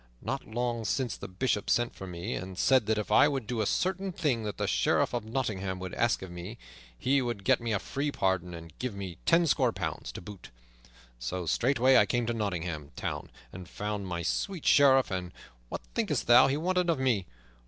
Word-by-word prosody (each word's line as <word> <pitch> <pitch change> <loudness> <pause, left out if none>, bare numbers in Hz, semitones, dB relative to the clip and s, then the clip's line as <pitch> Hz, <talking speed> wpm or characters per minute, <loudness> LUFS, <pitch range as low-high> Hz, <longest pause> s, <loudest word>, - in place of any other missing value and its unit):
Not 135 +3 -3
long 120 0 -2
since 110 +4 -1
the - - -8
Bishop 105 +3 -1
sent 120 0 +2
for 95 - -8
me, 90 +6 -4
and 95 0 -6
said 130 -1 +3
that 110 0 +2
if 105 - -3
I - - +7
would 135 -5 -2
do 115 0 -2
a 105 - 0
certain 190 +1 0
thing 140 -9 0
that 105 - -4
the - - -1
Sheriff - - +2
of 120 -2 -1
Nottingham 105 -6 -2
would 95 -1 -6
ask 120 -4 +1
of 95 - -8
me, 90 +6 -7 0.4
he 135 - +2
would 120 -5 -3
get - - +3
me 115 -1 -2
a 105 - +2
free 140 +8 -3
pardon, 95 -6 -1
and 85 -1 -10
give 125 -5 -3
me 95 -4 -6
tenscore 165 -2 +4
pounds - - -4
to - - -6
boot. 100 +1 -10 0.7
So 90 +9 -3
straightway 130 - +3
I - - +5
came 120 -1 0
to 120 - -1
Nottingham 90 -9 -3
Town - - -4 0.2
and 90 -1 -9
found 105 -1 -4
my 85 -1 -3
sweet 185 - -2
Sheriff; 135 -4 +5
and 90 -1 -3 0.4
what - - -5
thinkest - - 0
thou 120 +2 +7
he 135 +1 0
wanted 180 +2 +1
of 165 - +2
me? 120 -8 +1
110 Hz, 205 wpm, -29 LUFS, 95-130 Hz, 0.7 s, I